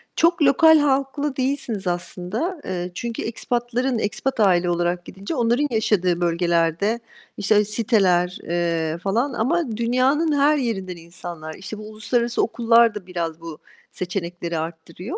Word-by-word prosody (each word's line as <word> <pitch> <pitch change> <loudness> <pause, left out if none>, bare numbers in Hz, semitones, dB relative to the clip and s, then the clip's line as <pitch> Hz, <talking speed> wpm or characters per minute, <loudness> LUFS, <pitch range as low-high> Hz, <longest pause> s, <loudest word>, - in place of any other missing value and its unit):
Çok 335 0 +3
lokal 315 +3 +6
halklı 280 0 0
değilsiniz 255 -7 -2
aslında. 185 - -3
Eee, 180 -1 -3
çünkü 235 -1 -4
expat'ların 240 +2 -1
expat 235 +4 -2
aile 180 -4 +4
olarak 175 0 -1
gidince 195 - -6
onların 240 +4 +2
yaşadığı 185 -6 +1
bölgelerde, 170 +5 +1 0.4
işte, 210 +1 +3
siteler, 195 -5 +2
eee, 170 -2 -1
falan 225 +10 -1
ama 255 0 0
dünyanın 265 +6 +2
her 295 +2 +4
yerinden 190 -8 -2
insanlar. 170 -1 -8
İşte, 195 +3 -8
bu 215 - -9
uluslararası 235 +3 -1
okullar 230 -1 +4
da 190 -3 -7
biraz 170 -3 -4
bu 165 -2 -8 0.3
seçenekleri 175 -2 -4
artırıyor. 165 - -6
210 Hz, 130 wpm, -22 LUFS, 175-250 Hz, 0.4 s, lokal